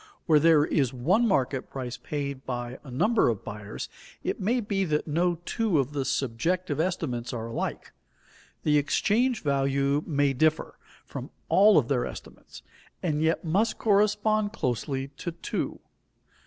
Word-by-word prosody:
Where 155 Hz, -3 st, +5 dB
there 155 Hz, -1 st, +5 dB
is 135 Hz, -7 st, +1 dB
one 180 Hz, -, +2 dB
market 135 Hz, -, 0 dB
price 125 Hz, -2 st, -5 dB
paid 140 Hz, +1 st, -4 dB
by 120 Hz, 0 st, -5 dB
a 140 Hz, -, -11 dB
number 175 Hz, -, +3 dB
of 110 Hz, -4 st, -2 dB
buyers, 105 Hz, 0 st, -6 dB, 0.4 s
it -, -, -2 dB
may 235 Hz, +6 st, +1 dB
be 205 Hz, -3 st, -1 dB
that 150 Hz, -3 st, 0 dB
no 170 Hz, +3 st, +1 dB
two 220 Hz, -8 st, +1 dB
of 140 Hz, +1 st, 0 dB
the 140 Hz, -2 st, -1 dB
subjective 145 Hz, +6 st, -1 dB
estimates 145 Hz, -9 st, -2 dB
are 115 Hz, -2 st, -4 dB
alike; 115 Hz, -, -4 dB, 0.7 s
the 150 Hz, -1 st, +4 dB
exchange 225 Hz, -, +1 dB
value 140 Hz, 0 st, +1 dB
may 145 Hz, -3 st, +2 dB
differ 155 Hz, +4 st, +1 dB, 0.3 s
from -, -, -7 dB, 0.2 s
all 205 Hz, +2 st, +6 dB
of 135 Hz, -6 st, +3 dB
their 125 Hz, -3 st, 0 dB
estimates, -, -, -11 dB, 0.4 s
and 155 Hz, -4 st, 0 dB
yet 160 Hz, +2 st, +1 dB
must 200 Hz, +8 st, +1 dB
correspond 210 Hz, 0 st, +2 dB
closely 135 Hz, -, -2 dB
to 170 Hz, -, -4 dB
two. 170 Hz, -, -3 dB
150 Hz, 150 wpm, -27 LUFS, 135-185 Hz, 0.7 s, all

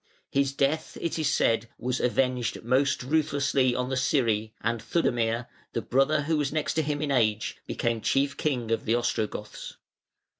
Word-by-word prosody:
His 140 Hz, -1 st, +2 dB
death, 140 Hz, +3 st, -1 dB
it 165 Hz, -1 st, -2 dB
is 155 Hz, -3 st, +1 dB
said, 115 Hz, -4 st, +2 dB
was 125 Hz, +1 st, -2 dB
avenged 125 Hz, -1 st, 0 dB
most 130 Hz, +3 st, +2 dB
ruthlessly 140 Hz, -3 st, +1 dB
on 125 Hz, 0 st, -1 dB
the 130 Hz, -, -1 dB
Scyri, 115 Hz, -5 st, +1 dB
and 115 Hz, 0 st, -1 dB
Theudemir, 120 Hz, -7 st, 0 dB, 0.3 s
the 115 Hz, -, -2 dB
brother 140 Hz, +3 st, +2 dB
who 160 Hz, +1 st, +1 dB
was 145 Hz, -2 st, 0 dB
next 155 Hz, +1 st, -1 dB
him 150 Hz, -1 st, -1 dB
in 145 Hz, -, -1 dB
age, 110 Hz, -4 st, +1 dB
became 115 Hz, -1 st, -1 dB
chief 140 Hz, +4 st, +1 dB
king 125 Hz, -7 st, -1 dB
of 115 Hz, -, 0 dB
the 115 Hz, -, +2 dB
Ostrogoths. 110 Hz, -3 st, -3 dB
130 Hz, 160 wpm, -27 LUFS, 115-145 Hz, 0.3 s, His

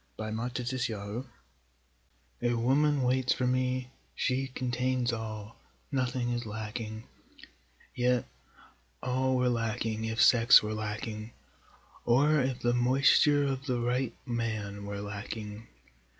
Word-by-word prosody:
A 110 Hz, 0 st, -4 dB
Woman 115 Hz, +2 st, -2 dB
Waits 125 Hz, +1 st, -3 dB
for 105 Hz, +1 st, -4 dB
Me -, -, -12 dB, 1.2 s
A 120 Hz, -, +1 dB
woman 135 Hz, +4 st, +2 dB
waits 130 Hz, 0 st, +2 dB
for 130 Hz, -, -1 dB
me, 130 Hz, 0 st, 0 dB, 0.2 s
she 130 Hz, +1 st, 0 dB
contains 125 Hz, -1 st, -1 dB
all, 110 Hz, -1 st, -6 dB, 0.3 s
nothing 125 Hz, -2 st, 0 dB
is 120 Hz, 0 st, -2 dB
lacking, 110 Hz, 0 st, -5 dB, 0.9 s
Yet 125 Hz, -1 st, +1 dB, 0.8 s
all 130 Hz, +1 st, +1 dB
were 125 Hz, 0 st, +2 dB
lacking 115 Hz, -2 st, -1 dB
if 110 Hz, +1 st, -3 dB
sex 120 Hz, -2 st, +7 dB
were 105 Hz, 0 st, -2 dB
lacking, 110 Hz, +1 st, -5 dB, 0.7 s
or 145 Hz, +6 st, +4 dB
if 125 Hz, -1 st, -2 dB
the 120 Hz, 0 st, +2 dB
moisture 135 Hz, +4 st, +4 dB
of 135 Hz, 0 st, -2 dB
the 125 Hz, -2 st, 0 dB
right 120 Hz, 0 st, -1 dB
man 110 Hz, -5 st, -3 dB
were 100 Hz, 0 st, -4 dB
lacking. 105 Hz, +1 st, -6 dB
120 Hz, 125 wpm, -30 LUFS, 110-130 Hz, 1.2 s, sex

